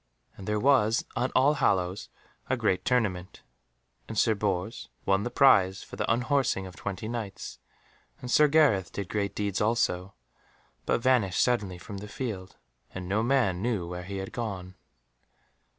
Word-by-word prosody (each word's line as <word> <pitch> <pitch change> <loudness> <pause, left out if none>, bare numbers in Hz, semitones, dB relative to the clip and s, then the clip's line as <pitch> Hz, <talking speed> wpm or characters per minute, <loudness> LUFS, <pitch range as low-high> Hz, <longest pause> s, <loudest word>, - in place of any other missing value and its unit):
And 95 - -10
there 105 0 0
was 120 -3 +3
on 125 +1 0
All 135 +3 +5
Hallows 95 -8 0 0.4
a - - +1
great 95 - +1
tournament, 100 -8 -1 0.6
and 110 - -6
Sir 110 - +4
Bors 100 +1 -3 0.2
won 95 0 +3
the 120 - -2
prize 95 -8 +4
for - - -10
the - - -1
unhorsing 125 -3 +1
of 90 -2 -10
twenty 100 +2 -5
Knights, 110 -4 -6 0.6
and 125 - -6
Sir 150 +3 +6
Gareth 140 - +3
did 100 -2 -5
great 100 -2 -2
deeds 100 -2 -1
also, 100 -4 0 0.7
but - - +1
vanished 120 -8 +3
suddenly 105 -7 0
from 100 +3 -8
the 105 - -8
field, 100 -6 -5 0.4
and 90 -1 -5
no 100 +4 +1
man 115 -7 +1
knew 110 -6 -1
where 90 0 -5
he 95 +2 -6
had 95 0 -6
gone. 95 -6 -5
105 Hz, 160 wpm, -28 LUFS, 95-120 Hz, 0.7 s, Sir